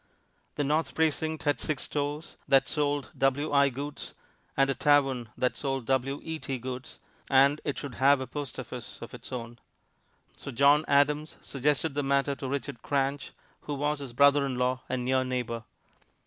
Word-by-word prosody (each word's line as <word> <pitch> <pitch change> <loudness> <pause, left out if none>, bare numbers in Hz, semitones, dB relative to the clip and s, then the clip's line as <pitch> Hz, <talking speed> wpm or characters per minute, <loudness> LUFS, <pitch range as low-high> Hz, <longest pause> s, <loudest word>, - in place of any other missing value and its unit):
The 145 - 0
North 150 +3 0
Precinct 160 0 0
had 145 -3 +1
six 150 -3 -2
stores 145 +2 -3
that 135 -1 +5
sold 145 -2 -1
W.I. 140 +1 +3
goods, 140 +3 -6 0.4
and 135 0 +5
a 135 - +1
tavern 135 -5 +2
that 125 - +1
sold 135 -3 -2
W.E.T. 135 +3 -2
goods, 130 +1 -7 0.3
and 140 +2 +5
it 145 - -2
should 140 -3 -5
have 140 +1 +6
a 130 - -3
post 145 -1 -6
office - - -7
of - - -9
its - - -10
own. 120 -1 -6 0.8
So - - -8
John 140 +4 +4
Adams 145 +2 +2
suggested 145 +3 0
the 145 - 0
matter 140 0 +1
to 135 -1 -6
Richard 140 -3 -4
Cranch, 140 0 -1 0.3
who 145 - -5
was 145 +1 -1
his 135 -4 -7
brother 140 +2 +5
in 135 -2 -2
law 125 +1 0
and 125 -1 -2
near 130 0 +2
neighbor. 120 -3 -3
140 Hz, 165 wpm, -29 LUFS, 130-145 Hz, 0.8 s, have